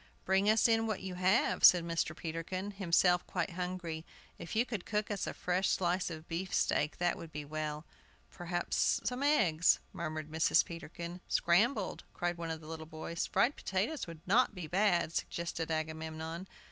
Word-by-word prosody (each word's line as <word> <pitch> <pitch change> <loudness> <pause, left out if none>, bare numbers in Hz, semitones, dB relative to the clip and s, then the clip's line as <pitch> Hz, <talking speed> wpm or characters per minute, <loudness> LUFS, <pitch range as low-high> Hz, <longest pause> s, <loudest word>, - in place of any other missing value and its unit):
"Bring 195 +2 +3
us 220 +2 +5
in 225 0 +2
what 215 -3 -2
you 190 -1 -4
have," 185 +5 +2
said 175 -2 +8
Mr. 165 -1 -2
Peterkin, 170 +4 -4
himself 180 -2 +3
quite - - -2
hungry. 175 -2 -4 0.4
"If 170 - -6
you 230 +3 +3
could 220 -7 -4
cook 210 0 -2
us 200 - -2
a - - -3
fresh 180 +2 0
slice 180 0 +1
of 160 -1 -8
beefsteak 165 -3 0
that 175 0 +1
would 165 - -9
be 150 -1 -6
well." 155 +1 -4 0.5
"Perhaps 175 0 0
some 250 +2 -2
eggs," 185 - +4 0.2
murmured 155 -2 -4
Mrs. 160 0 +4
Peterkin. 170 +1 -7
"Scrambled," 200 +4 +2
cried 175 -1 -2
one 165 -1 -4
of 160 0 -4
the 155 - -12
little 160 0 -7
boys. 160 +2 -4
"Fried 235 +9 +2
potatoes 205 - -2
would 165 -2 -9
not 215 +3 +3
be 180 -3 -5
bad," 175 -1 +2
suggested 170 -1 -3
Agamemnon. 160 +2 -4
175 Hz, 170 wpm, -33 LUFS, 160-190 Hz, 0.5 s, said